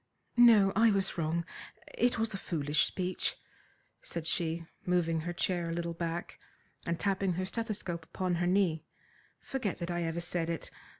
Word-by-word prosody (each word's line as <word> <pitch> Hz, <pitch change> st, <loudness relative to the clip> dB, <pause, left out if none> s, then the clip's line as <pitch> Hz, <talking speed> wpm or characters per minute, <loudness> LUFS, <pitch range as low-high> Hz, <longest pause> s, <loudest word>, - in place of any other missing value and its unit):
"No, 220 Hz, -5 st, +7 dB
I 225 Hz, +2 st, +6 dB
was 195 Hz, -2 st, +1 dB
wrong. 165 Hz, 0 st, 0 dB, 0.5 s
It 245 Hz, +1 st, +2 dB
was 225 Hz, -1 st, 0 dB
a -, -, -2 dB
foolish 150 Hz, -5 st, +1 dB
speech," 185 Hz, 0 st, -1 dB, 0.7 s
said 170 Hz, -2 st, -5 dB
she, 165 Hz, -1 st, 0 dB, 0.2 s
moving 170 Hz, -2 st, +1 dB
her 170 Hz, +2 st, -3 dB
chair 175 Hz, -1 st, 0 dB
a -, -, -2 dB
little 170 Hz, 0 st, -2 dB
back, 170 Hz, 0 st, -4 dB, 0.5 s
and 170 Hz, 0 st, 0 dB
tapping 195 Hz, -2 st, +1 dB
her 185 Hz, +2 st, -1 dB
stethoscope 195 Hz, -6 st, -3 dB
upon 185 Hz, +2 st, -2 dB
her 175 Hz, -, +2 dB
knee. 180 Hz, -4 st, +2 dB, 0.6 s
"Forget 250 Hz, -8 st, -2 dB
that 175 Hz, 0 st, -3 dB
I 175 Hz, 0 st, -1 dB
ever 165 Hz, 0 st, -1 dB
said 170 Hz, -1 st, -1 dB
it. 165 Hz, -2 st, -3 dB
175 Hz, 165 wpm, -32 LUFS, 165-195 Hz, 0.7 s, No